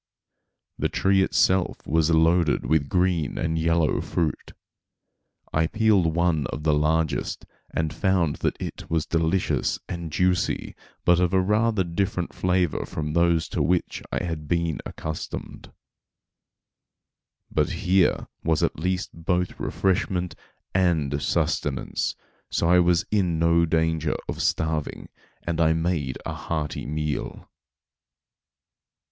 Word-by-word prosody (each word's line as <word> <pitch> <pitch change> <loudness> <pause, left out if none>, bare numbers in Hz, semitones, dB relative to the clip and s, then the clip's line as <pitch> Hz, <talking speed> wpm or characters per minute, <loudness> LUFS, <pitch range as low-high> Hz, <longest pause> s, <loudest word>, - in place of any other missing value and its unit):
The - - +1
tree 95 0 +2
itself 95 -1 +1
was 80 0 +2
loaded 80 0 +3
with 75 -3 +1
green 90 -4 +1
and 80 -1 -1
yellow 85 -1 +2
fruit. 80 -3 -2 1.0
I 80 +1 +2
peeled 100 -6 +2
one 85 -4 +1
of 75 - -6
the 75 -1 +3
largest, 80 +1 0 0.3
and 80 -1 -1
found 90 -3 +1
that - - -1
it - - -6
was 80 -1 0
delicious 85 +3 0
and 85 -2 -5
juicy, 90 +2 0 0.3
but 90 0 +5
of 90 0 +1
a - - +5
rather 105 +1 +2
different 90 0 -2
flavor 90 -3 0
from 75 -1 -4
those 85 -1 +2
to - - -1
which 90 0 0
I - - -1
had 80 -4 -4
been 85 -3 0
accustomed. 80 0 -6 1.8
But - - +1 0.2
here 95 0 +3 0.2
was 80 -2 +1
at - - 0
least 90 +3 -1
both 90 +2 -1
refreshment 90 -2 0 0.4
and 80 -6 +1
sustenance, 65 0 -1 0.3
so - - 0
I 90 +1 +6
was 85 -1 +3
in 90 -6 +1
no 85 +1 +3
danger 80 -1 +1
of - - -4
starving, 80 -2 -1 0.3
and 85 -1 -1
I 80 -1 +4
made 80 -5 -1
a - - -3
hearty 75 -4 -4
meal. 75 0 -3
85 Hz, 125 wpm, -25 LUFS, 80-90 Hz, 1.8 s, I